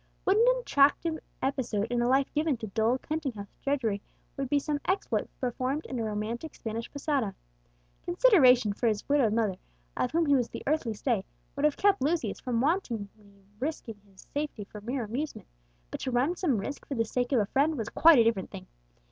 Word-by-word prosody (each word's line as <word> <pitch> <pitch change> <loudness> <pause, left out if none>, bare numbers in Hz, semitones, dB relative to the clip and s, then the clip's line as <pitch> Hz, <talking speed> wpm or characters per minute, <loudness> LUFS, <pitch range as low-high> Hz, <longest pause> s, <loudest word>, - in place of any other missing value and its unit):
What 385 - +3
an 455 +3 +4
attractive 315 - +2 0.2
episode 250 -6 0
in 240 0 +1
a 240 - +2
life 265 +2 +4
given 300 -3 +1
to 220 - -6
dull 220 +4 +1
counting 305 -1 -3
house 200 -2 -9
drudgery 235 -8 0 0.3
would 275 -2 -3
be 290 - +3
some 290 0 -1
exploit 385 +2 0
performed 255 +4 -2
in 255 - -4
a - - -1
romantic 220 +7 -4
Spanish 225 +1 -5
posada! 275 -8 -1 0.7
Consideration 280 - +5
for 235 - -1
his 210 -2 -1
widowed 280 -6 +3
mother, 215 -5 0 0.4
of 250 - 0
whom 330 +3 +1
he 285 -2 +4
was 245 -3 +1
the - - -7
earthly 275 -7 0
stay, 225 -3 0 0.3
would 280 +1 0
have 300 - +2
kept 400 -4 +3
Lucius 315 +4 0
from 240 -3 -1
wantonly 260 - 0 0.5
risking 245 -6 -4
his 195 -1 -17
safety 290 -7 -3
for 210 +1 -11
mere 245 +4 -3
amusement; 260 +8 -4 0.5
but - - -5
to - - -3
run 255 +8 +1
some 310 - +1
risk 280 +8 -5
for 280 - -3
the 230 -1 +1
sake 245 +3 -2
of 260 - +4
a 210 - +2
friend 290 +8 +1
was 225 -1 -3
quite 330 -2 +6
a 235 - +7
different 225 -5 0
thing. - - -9
260 Hz, 200 wpm, -29 LUFS, 225-300 Hz, 0.7 s, a